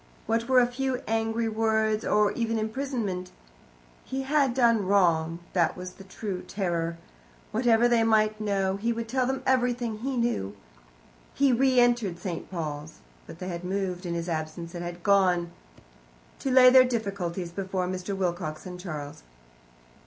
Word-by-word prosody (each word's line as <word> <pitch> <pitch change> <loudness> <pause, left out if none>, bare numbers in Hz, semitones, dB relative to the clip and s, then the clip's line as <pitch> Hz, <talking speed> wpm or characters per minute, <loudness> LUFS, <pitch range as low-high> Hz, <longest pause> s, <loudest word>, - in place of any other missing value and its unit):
What 230 +2 -1
were 260 -1 +6
a 245 - +5
few 255 +1 -2
angry 225 +1 0
words, 220 0 +1
or 210 -1 +3
even 230 -1 -1
imprisonment? 220 -5 -3 0.7
He 265 +1 -4
had 275 -3 +2
done 230 -6 +3
wrong 170 -4 +2 0.2
that 170 -2 +1
was 180 0 -6
the 195 - -13
true 190 -1 -5
terror. 170 -4 -2 0.5
Whatever 235 0 +3
they 240 -1 +3
might 215 -1 +2
know, 195 -2 0
he 230 +4 -1
would 230 0 -3
tell 255 +2 0
them 265 0 -2
everything 245 -3 +1
he 265 +2 -3
knew. 170 - -1 0.8
He 275 -2 +3
re 260 +1 +3
entered 240 -7 +2
St. 175 -1 -5
Paul's. 155 -3 -5 0.3
But - - -10
they 185 +1 -6
had 175 0 -5
moved 185 -1 -3
in 170 - -2
his 170 0 -3
absence, 165 +1 -4
and 175 -1 -5
had 175 0 -7
gone 180 -4 +3 0.9
to 270 - -2
lay 255 -1 +8
their 260 0 +8
difficulties 200 -7 -3
before 190 0 -2
Mr. 185 +2 -4
Wilcox 175 -4 -3
and 180 -1 -7
Charles. 150 - -7
205 Hz, 160 wpm, -27 LUFS, 180-235 Hz, 0.9 s, lay